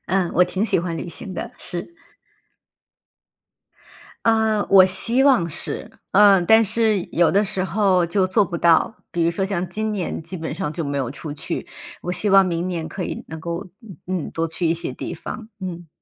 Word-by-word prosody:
嗯， 185 Hz, -1 st, 0 dB
我 180 Hz, -, +5 dB
挺 190 Hz, +4 st, 0 dB
喜 -, -, +2 dB
欢 170 Hz, -2 st, -4 dB
旅 175 Hz, -, -5 dB
行 185 Hz, +3 st, -7 dB
的， -, -, -6 dB
是。 175 Hz, -, -7 dB, 2.3 s
呃， 220 Hz, -2 st, +2 dB
我 190 Hz, -1 st, +8 dB
希 230 Hz, +7 st, +3 dB
望 255 Hz, -12 st, +4 dB
是， 170 Hz, +2 st, -3 dB, 0.2 s
嗯， 195 Hz, -2 st, +6 dB
但 220 Hz, +4 st, +6 dB
是 215 Hz, -2 st, +1 dB
有 170 Hz, 0 st, +3 dB
的 205 Hz, +2 st, +3 dB
时 190 Hz, -1 st, -2 dB
候 190 Hz, -1 st, +2 dB
就 185 Hz, +2 st, +1 dB
做 200 Hz, +2 st, +3 dB
不 170 Hz, -, -4 dB
到。 170 Hz, +6 st, +3 dB
比 170 Hz, -1 st, 0 dB
如 165 Hz, -, +3 dB
说 190 Hz, +3 st, -2 dB
像 190 Hz, -2 st, -2 dB
今 215 Hz, 0 st, -3 dB
年 185 Hz, -5 st, -3 dB
基 175 Hz, +4 st, -7 dB
本 160 Hz, -1 st, -5 dB
上 150 Hz, -, -3 dB
就 165 Hz, 0 st, -4 dB
没 140 Hz, 0 st, -2 dB
有 130 Hz, -3 st, -2 dB
出 150 Hz, +1 st, -7 dB
去， 145 Hz, -, -5 dB, 0.4 s
我 180 Hz, -, -3 dB
希 210 Hz, -, 0 dB
望 195 Hz, -1 st, +6 dB
明 175 Hz, 0 st, -2 dB
年 165 Hz, -3 st, -3 dB
可 185 Hz, -, -5 dB
以 -, -, -5 dB
能 160 Hz, 0 st, -7 dB
够， 170 Hz, +4 st, -5 dB, 0.4 s
嗯， 180 Hz, -4 st, -3 dB
多 165 Hz, 0 st, -1 dB
去 165 Hz, +1 st, -2 dB
一 165 Hz, -, +2 dB
些 170 Hz, -, -5 dB
地 -, -, -6 dB
方， 225 Hz, -2 st, -7 dB
嗯。 175 Hz, -3 st, -6 dB
185 Hz, 210 characters per minute, -22 LUFS, 170-200 Hz, 2.3 s, 我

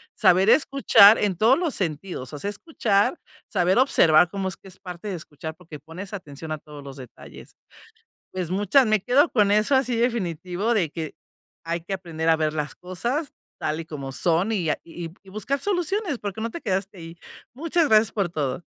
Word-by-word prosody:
saber 190 Hz, 0 st, +4 dB
escuchar 250 Hz, -7 st, +6 dB
en 195 Hz, -4 st, 0 dB
todos 225 Hz, +7 st, +4 dB
los 340 Hz, -6 st, -1 dB
sentidos. 155 Hz, -6 st, -4 dB
O 145 Hz, -, -6 dB
sea, 200 Hz, -, -3 dB
escuchar, 205 Hz, -, 0 dB, 0.3 s
saber 185 Hz, -1 st, +1 dB
observar 175 Hz, -, +5 dB
cómo 195 Hz, 0 st, -3 dB
es 185 Hz, -, -4 dB
que -, -, -17 dB
es 185 Hz, -, -14 dB
parte 180 Hz, +2 st, -8 dB
de 195 Hz, -, -3 dB
escuchar, 160 Hz, -1 st, -8 dB
porque 160 Hz, -3 st, -12 dB
pones 170 Hz, +8 st, -10 dB
atención 155 Hz, -4 st, -8 dB
a 155 Hz, -, -2 dB
todos 150 Hz, -1 st, -12 dB
los 140 Hz, 0 st, -10 dB
detalles. 130 Hz, -3 st, -13 dB, 0.8 s
Pues, 180 Hz, -2 st, -4 dB
muchas 205 Hz, +8 st, +3 dB
me 215 Hz, -2 st, +2 dB
quedo 265 Hz, -, +3 dB
con 210 Hz, -4 st, +3 dB
eso 215 Hz, +6 st, +2 dB
así 255 Hz, -2 st, +1 dB
definitivo 205 Hz, -3 st, -1 dB
de 170 Hz, -8 st, 0 dB
que, 160 Hz, -2 st, -6 dB, 0.5 s
hay 170 Hz, +1 st, -2 dB
que 185 Hz, +4 st, -6 dB
aprender 165 Hz, -4 st, -3 dB
a 165 Hz, -, +6 dB
ver 155 Hz, -1 st, 0 dB
las 150 Hz, -2 st, -3 dB
cosas 240 Hz, -, -3 dB, 0.3 s
tal 155 Hz, +1 st, -2 dB
y -, -, -10 dB
como 140 Hz, -4 st, -7 dB
son, 175 Hz, +7 st, +1 dB
y 175 Hz, -7 st, -1 dB
a -, -, -1 dB
y 170 Hz, 0 st, -8 dB
y 195 Hz, -, -16 dB
buscar 215 Hz, +8 st, -2 dB
soluciones, 370 Hz, -, -1 dB
porque 205 Hz, -1 st, -6 dB
no 230 Hz, -, -2 dB
te 335 Hz, -, -8 dB
quedaste 195 Hz, 0 st, -2 dB
ahí. 165 Hz, 0 st, -10 dB, 0.4 s
Muchas 330 Hz, +4 st, +1 dB
gracias 215 Hz, -1 st, +4 dB
por 200 Hz, -4 st, 0 dB
todo. 145 Hz, -1 st, -3 dB
190 Hz, 195 wpm, -24 LUFS, 165-225 Hz, 0.8 s, escuchar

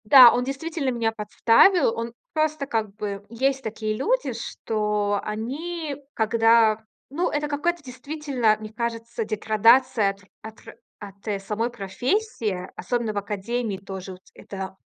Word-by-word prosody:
Да, 245 Hz, +1 st, +9 dB
он 245 Hz, -, +1 dB
действительно 275 Hz, +2 st, -3 dB
меня 230 Hz, -3 st, 0 dB
подставил. 225 Hz, -, +4 dB
Он 230 Hz, 0 st, -4 dB, 0.2 s
просто 310 Hz, -2 st, 0 dB
как 220 Hz, -6 st, -2 dB
бы 205 Hz, -2 st, -5 dB
Есть 265 Hz, +3 st, 0 dB
такие 215 Hz, 0 st, -3 dB
люди, -, -, 0 dB
что 210 Hz, -2 st, -1 dB
они, 290 Hz, +9 st, -4 dB, 0.2 s
когда 225 Hz, -1 st, +3 dB, 0.3 s
Ну, 335 Hz, +6 st, 0 dB
это 295 Hz, 0 st, -1 dB
какая-то 305 Hz, +3 st, -1 dB
действительно, 265 Hz, -3 st, -1 dB
мне 215 Hz, 0 st, -8 dB
кажется, 230 Hz, 0 st, -3 dB
деградация 220 Hz, +1 st, +3 dB
от 195 Hz, -, -15 dB
р 185 Hz, -, -22 dB, 0.2 s
от 220 Hz, 0 st, -11 dB
р -, -, -11 dB, 0.3 s
от, 200 Hz, +1 st, -12 dB
э, 205 Hz, -2 st, -1 dB
самой 215 Hz, +4 st, -2 dB
профессии, 215 Hz, -, -2 dB
особенно 235 Hz, -3 st, -2 dB
в -, -, -5 dB
академии 210 Hz, +2 st, -2 dB
тоже. 190 Hz, -1 st, -7 dB
Вот 180 Hz, -, -14 dB
это 190 Hz, -1 st, -7 dB
230 Hz, 145 wpm, -24 LUFS, 210-270 Hz, 0.3 s, Да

